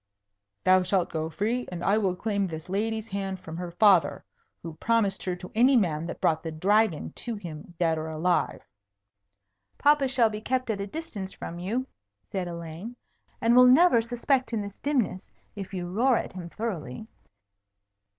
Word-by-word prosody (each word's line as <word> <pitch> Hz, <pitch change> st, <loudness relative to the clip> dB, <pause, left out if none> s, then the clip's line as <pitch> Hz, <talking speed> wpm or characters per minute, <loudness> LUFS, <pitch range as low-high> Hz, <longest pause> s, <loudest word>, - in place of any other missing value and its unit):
"Thou 185 Hz, 0 st, +5 dB
shalt 180 Hz, -1 st, 0 dB
go 160 Hz, 0 st, -2 dB
free, 225 Hz, +8 st, -1 dB
and 175 Hz, -1 st, -5 dB
I 205 Hz, +2 st, +3 dB
will 190 Hz, -4 st, 0 dB
claim 200 Hz, 0 st, -1 dB
this 160 Hz, 0 st, -7 dB
lady's 220 Hz, +3 st, -1 dB
hand 195 Hz, -1 st, -3 dB
from 160 Hz, -, -8 dB
her 175 Hz, 0 st, -4 dB
father, 175 Hz, -4 st, +4 dB, 0.4 s
who 165 Hz, -1 st, -6 dB
promised 220 Hz, -1 st, +1 dB
her 180 Hz, -1 st, -1 dB
to 180 Hz, 0 st, -10 dB
any 250 Hz, +5 st, +5 dB
man 165 Hz, -8 st, +1 dB
that 170 Hz, -, -6 dB
brought 160 Hz, -1 st, +2 dB
the 165 Hz, -, -5 dB
Dragon 195 Hz, +1 st, +1 dB
to 235 Hz, -2 st, -5 dB
him 170 Hz, -3 st, -9 dB
dead 165 Hz, -2 st, +1 dB
or 160 Hz, +1 st, -4 dB
alive." 165 Hz, +3 st, 0 dB, 1.1 s
"Papa 290 Hz, -1 st, +4 dB
shall 245 Hz, -4 st, +3 dB
be 210 Hz, 0 st, -5 dB
kept 255 Hz, 0 st, -1 dB
at 200 Hz, -2 st, -3 dB
a 200 Hz, -, -3 dB
distance 205 Hz, -8 st, -6 dB
from 170 Hz, -, -7 dB
you," 225 Hz, +9 st, -2 dB, 0.5 s
said 185 Hz, -2 st, -2 dB
Elaine, 170 Hz, +6 st, -7 dB, 0.5 s
"and 230 Hz, +1 st, +4 dB
will 250 Hz, 0 st, +8 dB
never 255 Hz, -2 st, +6 dB
suspect 245 Hz, +2 st, 0 dB
in 220 Hz, -, 0 dB
this 200 Hz, 0 st, -9 dB
dimness, 240 Hz, -10 st, -1 dB, 0.3 s
if 195 Hz, -2 st, -7 dB
you 180 Hz, -2 st, -4 dB
roar 235 Hz, +7 st, +3 dB
at -, -, -4 dB
him 180 Hz, -2 st, -7 dB
thoroughly." 185 Hz, -, -5 dB
195 Hz, 175 wpm, -27 LUFS, 175-230 Hz, 1.1 s, will